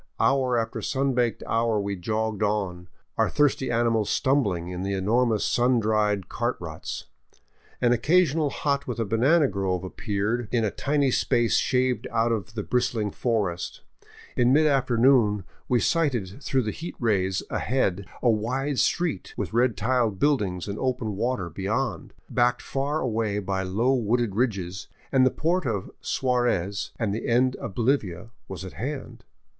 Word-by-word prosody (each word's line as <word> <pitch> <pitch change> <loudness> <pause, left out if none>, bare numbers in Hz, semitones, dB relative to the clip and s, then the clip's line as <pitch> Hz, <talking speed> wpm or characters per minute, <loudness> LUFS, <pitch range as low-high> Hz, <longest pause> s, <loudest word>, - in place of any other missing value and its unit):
Hour 130 -2 +2
after 115 -1 -2
sun 135 0 0
baked 120 -2 0
hour 115 -1 +1
we 100 0 -2
jogged 110 +3 -2
on, 100 -4 -1 0.3
our - - +3
thirsty 145 -3 +1
animals 115 -3 +1
stumbling 105 -11 +1
in 90 0 -5
the 100 +1 -2
enormous 110 +3 +1
sun 125 0 +3
dried 105 -3 +1
cart - - -2
ruts. - - -6 0.8
An 120 -1 +4
occasional 155 +3 +3
hut 140 0 -1
with 125 - -3
a 115 - 0
banana 135 +9 +3
grove 95 -4 -2
appeared 105 +4 -2
in 115 -3 +2
a 105 - 0
tiny 140 -2 +1
space 120 -1 +2
shaved 125 -3 +1
out 115 +1 +1
of 110 0 -3
the 105 - -2
bristling 115 -3 0
forest. 100 -8 -2 0.5
In 120 0 +3
mid 155 +3 +5
afternoon 125 -6 +3 0.3
we 125 - +3
sighted 130 - 0
through 135 -2 0
the 105 - -2
heat 170 +9 -7
rays 95 -5 0
ahead 100 -7 0 0.2
a 120 - +5
wide 130 +6 -1
street, 170 - 0
with - - -3
red 120 -3 +2
tiled 115 -1 +1
buildings 100 - 0
and 100 0 -4
open 125 -5 -1
water 115 -3 -1
beyond, 95 - -3
backed 125 0 +1
far 140 +3 -1
away 110 -4 -1
by 95 -1 -2
low 105 +8 +1
wooded 120 -3 +1
ridges, 95 -6 -1 0.2
and 130 -1 +5
the - - +4
Port 170 +2 0
of 100 -5 -3
Suarez 120 -7 0
and 110 -3 -1
the 110 - -3
end 125 +2 +3
of 95 - -7
Bolivia 110 - 0 0.2
was 95 0 -7
at 95 - -8
hand. 135 +3 -6
115 Hz, 160 wpm, -26 LUFS, 100-130 Hz, 0.8 s, mid